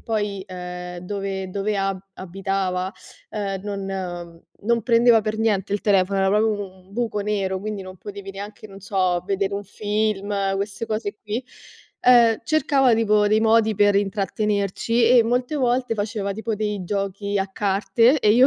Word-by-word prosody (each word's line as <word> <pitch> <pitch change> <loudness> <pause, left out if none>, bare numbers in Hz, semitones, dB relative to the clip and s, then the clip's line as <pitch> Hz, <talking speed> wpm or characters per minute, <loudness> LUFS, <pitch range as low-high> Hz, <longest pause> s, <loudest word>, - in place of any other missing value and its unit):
poi, 205 -3 -2
ehm, 180 -1 -7
dove 190 0 -4
dove 200 +2 -1
a 195 -1 -1 0.2
abitava, 190 0 -2 0.4
ehm, 200 -2 -3
non 185 -4 -5 0.2
non 235 0 +2
prendeva 235 0 +5
per 215 0 -3
niente 210 -4 +1
il 205 - 0
telefono, 195 -1 +2
era 195 - +3
proprio 210 +3 +3
un 195 -3 -5
buco 230 -1 -2
nero, 200 -2 -1
quindi 210 0 -5
non 185 0 -10
potevi 200 0 -8
neanche, 205 +2 -9
non 195 -1 -11
so, 185 -3 0
vedere 195 0 0
un 200 +1 -3
film, 210 0 -1 0.2
queste 200 +2 -3
cose 215 -2 -3
qui, 220 +4 -4 0.6
ehm, 235 -3 +6
cercava 275 -3 +3
tipo 210 -2 +3
dei 215 +1 +3
modi 220 0 +4
per 205 0 +4
intrattenerci, 205 +3 0
e 230 - +5
molte 245 +5 0
volte 250 -3 +1
faceva 205 -1 -2
tipo 220 +2 -3
dei 210 -2 -2
giochi 200 +1 -2
a 195 - -1
carte 220 +7 +3
e 210 - +4
io, 250 +4 +7
205 Hz, 160 wpm, -23 LUFS, 195-220 Hz, 0.6 s, io